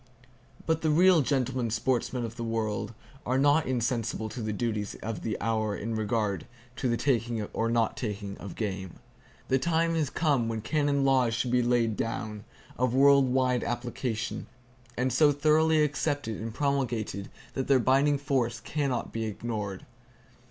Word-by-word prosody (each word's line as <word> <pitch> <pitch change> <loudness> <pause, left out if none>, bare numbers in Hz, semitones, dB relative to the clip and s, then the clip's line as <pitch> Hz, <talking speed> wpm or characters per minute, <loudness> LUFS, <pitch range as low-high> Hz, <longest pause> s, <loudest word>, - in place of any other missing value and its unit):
But 160 0 +1
the 160 - +1
real 175 +2 +6
gentlemen 130 -3 0
sportsmen 125 +1 0
of 115 0 -7
the 120 - -5
world 110 -1 -2 0.3
are 130 +1 0
not 145 +3 +3
insensible 115 -3 -1
to 115 +3 -6
the 110 -1 -2
duties 105 -1 -2
of 110 -4 -4
the 110 - -3
hour 110 -2 0
in 115 +2 -4
regard 105 -2 -1 0.3
to 130 - 0
the 120 - +1
taking 115 -4 0
or 115 +1 0
not 115 -1 +1
taking 100 -3 -4
of 100 - -8
game. 95 -4 -4 0.5
The 130 - +2
time 165 +2 +1
has 155 -4 0
come 140 -8 +1
when 115 -1 -2
canon 145 +2 +1
laws 130 -4 +3
should 120 +1 -1
be 125 0 +3
laid 120 -3 +1
down, 110 -2 -4 0.3
of 125 -1 +1
world 140 -1 +6
wide 125 -1 +2
application, 120 -1 -3 0.5
and 125 0 0
so 145 +3 +5
thoroughly 155 +2 +3
accepted 145 -6 -1
and 115 +1 -4
promulgated 120 -7 -1 0.2
that 130 - -2
their 135 - +5
binding 135 +4 +3
force 130 -4 0
can 140 +4 -2
not 125 -2 -3
be 115 0 -2
ignored. 105 -3 -4
120 Hz, 165 wpm, -28 LUFS, 110-140 Hz, 0.5 s, real